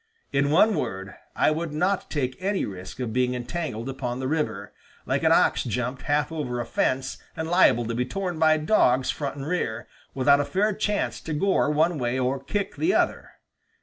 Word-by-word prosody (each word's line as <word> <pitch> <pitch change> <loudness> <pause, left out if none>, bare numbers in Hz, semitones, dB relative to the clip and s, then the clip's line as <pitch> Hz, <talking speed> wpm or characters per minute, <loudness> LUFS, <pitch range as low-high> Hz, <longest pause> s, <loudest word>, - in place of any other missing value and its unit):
In 140 +1 +2
one 200 +8 +5
word, 95 - -4 0.2
I - - +3
would 160 +1 -2
not 185 +5 0
take 130 -4 -2
any 195 +1 0
risk 95 +4 -8
of 120 -4 -3
being 125 0 +1
entangled 125 -2 -4
upon 130 -2 -4
the 130 - -2
river, 105 -9 -2 0.3
like - - 0
an - - +3
ox - - +4
jumped 125 +2 -3
half 145 +3 0
over 135 -7 -3
a 120 - -2
fence 130 +1 -1 0.2
and 160 0 -3
liable 165 -9 +4
to 115 - -3
be 120 +2 0
torn 185 -3 -3
by 155 -1 +5
dogs 145 -7 +3
front 140 -2 -4
and 140 -1 -6
rear, 120 -9 -2 0.3
without 140 +2 +4
a - - -2
fair 200 +9 +1
chance 210 +1 -1
to 160 - -5
gore 190 +1 +2
one 155 +2 +2
way 120 +1 -1
or 130 +1 -1
kick 200 +6 -3
the 355 +4 +2
other." - - 0
140 Hz, 195 wpm, -25 LUFS, 125-165 Hz, 0.3 s, one